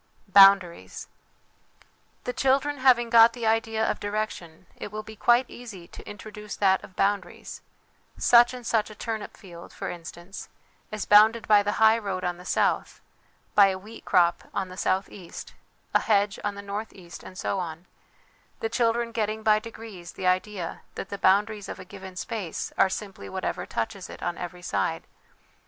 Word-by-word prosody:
Boundaries. 195 - +5 1.2
The 250 - -3
children 275 +2 +1
having 240 -3 +4
got 230 -1 +7
the 235 -2 -5
idea 220 0 +1
of - - -1
direction, 205 -5 -4
it - - -8
will 215 0 -5
be 220 0 -11
quite 240 +4 +4
easy 205 -8 -10
to - - -11
introduce 210 +1 -8
that 190 -2 +2
of 185 - -13
boundaries 200 -1 -2 0.6
such 240 0 +6
and 250 -2 -9
such 225 -2 +1
a 215 - -11
turnip 220 -1 -5
field, 175 -4 -12
for - - -5
instance, 175 +2 -9 0.4
is 215 -2 -4
bounded 220 +2 +5
by 210 -1 +6
the 205 +1 -1
highroad 220 -4 +2
on 175 -1 -2
the 180 - -13
south, - - 0 0.5
by 200 -1 +7
a 190 -1 -1
wheat 215 +4 -12
crop 175 -1 +2
on 190 -2 -2
the 185 - -9
south 190 +1 0
east, 180 -4 -10 0.4
a - - +5
hedge 205 -1 +1
on 205 -1 -2
the 200 - -8
north 205 +2 -5
east, 175 -3 -12
and 185 - -12
so 195 - -2
on; 165 -1 -6 0.7
the 450 - -2
children 235 - +1
getting 220 -1 -2
by 215 -1 +4
degrees 215 -5 -10
the 190 - -6
idea 185 -1 -1
that 195 - -6
the 200 - -5
boundaries 205 +2 +2
of - - -6
a - - -9
given 190 -2 -10
space 200 -3 -5
are 195 - +4
simply 195 0 -6
whatever 185 -1 -4
touches 205 -4 -4
it - - -10
on 175 - -2
every 180 0 -8
side. - - -1
205 Hz, 175 wpm, -26 LUFS, 185-225 Hz, 1.2 s, got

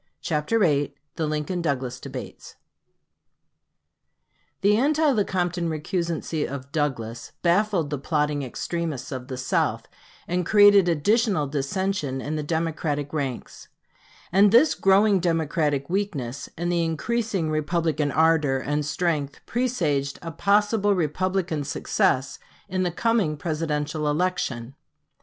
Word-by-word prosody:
CHAPTER 155 +8 0
VIII 145 -9 +2 0.2
THE 160 -2 -1
LINCOLN 155 +4 -2
DOUGLAS 135 -6 -2
DEBATES - - -8 2.1
The 205 +1 +4
anti 300 +5 +3
Lecompton 180 -6 0
recusancy 165 0 -2
of 140 0 -7
Douglas 120 -7 -3
baffled 175 -3 +2
the 145 - -2
plotting 150 0 0
extremists 150 +1 -4
of 130 -1 -5
the 130 -2 -5
South, 130 0 0 0.4
and 180 +1 0
created 205 -1 +6
additional 195 +1 +2
dissension 145 +1 -2
in 150 +4 -3
the 155 - -1
Democratic 155 -2 -2
ranks; 135 -5 -4 0.6
and 195 +2 +5
this 250 +8 +6
growing 195 +1 +4
Democratic 160 -4 0
weakness 150 - -3
and 175 +2 -1
the 170 -1 +1
increasing 190 +1 -1
Republican 155 -1 0
ardor 155 -3 +3
and 145 +3 -1
strength 150 -3 -1
presaged 165 - -1
a 165 - -5
possible 205 +2 +2
Republican 180 -1 -1
success 135 -1 0 0.3
in 185 -1 -2
the 180 - +1
coming 190 -4 +1
Presidential 150 -1 -2
election. 145 -7 -1
160 Hz, 115 wpm, -25 LUFS, 145-190 Hz, 2.1 s, created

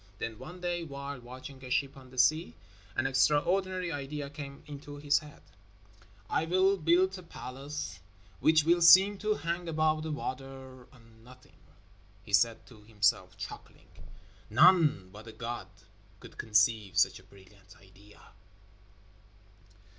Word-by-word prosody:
Then 115 -1 -5
one 175 +8 -10
day, 175 -1 -2
while 140 -2 -7
watching 130 +2 -11
a 130 - -8
ship 135 +2 0
on 130 -1 -14
the 130 - -15
sea, 130 - +2 0.4
an - - 0
extraordinary 175 +7 +1
idea 145 0 -5
came 140 -1 -9
into 145 -1 -9
his 145 0 +2
head. 150 -1 -15 0.8
"I 160 - 0
will 185 +3 +3
build 180 +3 +2
a - - -10
palace 135 - -7 0.4
which 155 -1 +4
will 170 +2 +3
seem 190 +4 +7
to 215 0 0
hang 170 0 -3
above 155 -1 +1
the 160 0 -4
water 130 -2 -7
on 115 -3 -20
nothing!" 130 +1 -18 0.6
he 105 - -12
said 110 +3 +3
to 115 -4 -16
himself, 105 -1 0
chuckling. - - -10 0.6
"None 150 - +4
but 105 +3 -12
a - - -8
god 115 -2 -6 0.5
could - - -14
conceive 105 -3 +2
such - - +3
a - - -18
brilliant 95 0 -19
idea." 100 +2 -19
140 Hz, 140 wpm, -30 LUFS, 115-160 Hz, 0.8 s, seem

